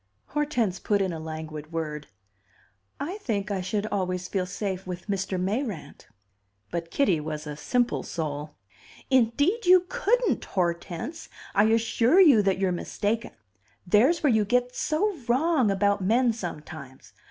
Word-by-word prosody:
Hortense 280 -11 0
put 205 -1 +1
in 190 -3 0
a 160 - -5
languid 155 -1 -7
word. 150 -3 -4 0.9
"I 350 +9 -4
think 210 - -2
I 195 -2 -1
should 205 +3 -2
always 185 -2 -1
feel 185 -1 -2
safe 190 0 -4
with 180 -1 -6
Mr. 195 -2 -2
Mayrant." 195 - -3 0.6
But 170 -1 -3
Kitty 190 - +2
was 155 0 -5
a 150 -1 -5
simple 245 - 0
soul. 150 -2 -5 0.6
"Indeed 285 - +2
you 365 0 +7
couldn't, - - +1
Hortense! 175 - -3 0.2
I 205 +2 +4
assure 230 - +3
you 290 - +7
that 195 -2 +1
you're 190 -1 +1
mistaken. 210 +5 -2 0.5
There's 245 - +3
where 280 -5 +4
you 220 -1 +3
get 245 +3 0
so 390 +6 0
wrong 260 -1 +3
about 200 +1 +2
men 230 +5 +3
sometimes. 155 - -8
200 Hz, 140 wpm, -26 LUFS, 175-250 Hz, 0.9 s, you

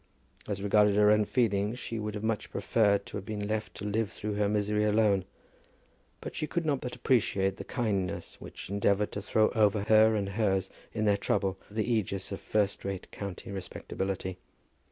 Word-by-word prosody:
As 100 -1 -3
regarded 105 0 +4
her 105 0 +6
own 105 0 +4
feelings, 105 -1 +1
she 115 -2 -5
would 105 0 -4
much 110 -1 0
have - - -19
preferred 100 0 +2
to - - -6
have 100 - -7
been 105 -2 -3
left 110 0 -3
to - - -6
live 105 +1 0
through 105 0 -4
her 105 0 +1
misery 105 0 +1
alone; 105 -3 +3 1.0
but - - -7
she 155 - -2
could 170 0 -2
not 140 -4 +1
but 125 - -5
appreciate 95 -6 +1
the - - -6
kindness 100 -7 -2
which - - -9
endeavoured 100 0 +2
to 105 - -4
throw 110 +2 +3
over 105 -3 +2
her 110 +1 +5
and 100 -2 -1
hers 95 -2 0 0.2
in 110 - -1
their 100 -1 +4
trouble 95 -2 0
the 110 +1 -1 0.2
ægis 100 0 -5
of - - -5
first 105 -2 0
rate 100 -1 -5
county 100 -1 -6
respectability. 95 -1 -4
105 Hz, 185 wpm, -30 LUFS, 100-110 Hz, 1.0 s, her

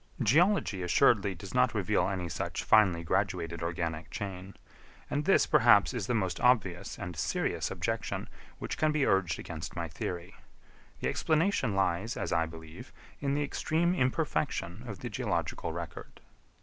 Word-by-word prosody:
Geology 150 - +3
assuredly 100 +1 +3
does 95 +3 -9
not 125 -1 +3
reveal 100 -1 +1
any 95 -3 -3
such 80 - -3
finely 95 -6 +4
graduated 85 -2 -1
organic 85 -1 -3
chain; 95 -2 -6 0.6
and 145 +1 -1
this, 195 - +5
perhaps, 120 -7 +5
is 115 -6 -3
the 125 - +1
most 95 -5 -1
obvious 100 -8 +1
and 90 -1 -6
serious 80 - -1
objection - - -3 0.3
which - - -5
can 155 0 +3
be 150 -3 +1
urged 90 -5 +2
against 80 -1 -7
my 85 -1 -3
theory. 85 +2 -5 0.7
The - - 0
explanation 155 - +1
lies, 95 +3 0
as - - -2
I 80 0 +2
believe, 80 0 -11 0.3
in 140 -1 0
the 145 - +1
extreme 160 +4 0
imperfection 130 - -1
of 100 -6 -7
the - - -4
geological - - -2
record. - - -8
100 Hz, 150 wpm, -30 LUFS, 85-130 Hz, 0.7 s, this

